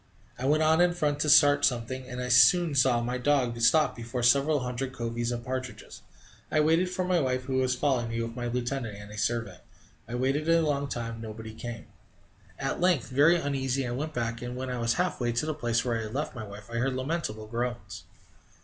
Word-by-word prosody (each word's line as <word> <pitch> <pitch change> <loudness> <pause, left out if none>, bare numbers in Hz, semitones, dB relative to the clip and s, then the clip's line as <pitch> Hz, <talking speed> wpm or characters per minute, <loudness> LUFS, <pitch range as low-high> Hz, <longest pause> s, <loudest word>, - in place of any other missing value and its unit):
I 130 - -3
went 155 +2 +3
on 160 +2 +4
in 175 0 +3
front 150 -4 0
to 150 - 0
start 145 0 +6
something, 125 +1 -1
and 125 - -6
I 125 - -3
soon 165 +6 +5
saw 130 -3 +3
my 125 +1 -2
dog 125 -4 +1
stop 155 +7 +4
before 120 +1 -5
several 140 +4 +3
hundred 125 +1 -4
coveys 120 -1 -3
of 120 0 -4
partridges. 130 0 -6 0.5
I 155 - +2
waited 165 +4 +3
for 185 0 -2
my 180 -1 +2
wife, 130 -3 -1
who 130 0 -2
was 130 -1 +1
following 125 -3 0
me 115 0 -3
with 115 0 -6
my 120 -1 -3
lieutenant 120 -2 -3
and 105 0 -11
a 105 - -9
servant. 115 -5 -2 0.5
I 120 - -5
waited 135 +5 0
a 165 0 +4
long 140 -2 0
time; 115 -3 -5
nobody 110 0 -8
came. 120 0 -7 0.7
At - - -3
length, 175 -8 +2
very 145 +6 +5
uneasy, 135 -4 -1
I 120 - -3
went 150 +5 -4
back, 115 -1 -2
and, 125 0 -5
when 130 0 -4
I 125 - -3
was 115 0 +1
half 180 -6 -1
way 120 -1 +1
to 120 +6 -1
the 155 - -1
place 120 -5 -1
where 115 -2 0
I - - -3
had 110 +1 -6
left 150 +2 -2
my 110 -4 -7
wife, 100 +2 -11
I 115 - -3
heard 130 +2 0
lamentable 130 -6 -3
groans. 115 -7 -5
125 Hz, 220 wpm, -28 LUFS, 115-145 Hz, 0.7 s, start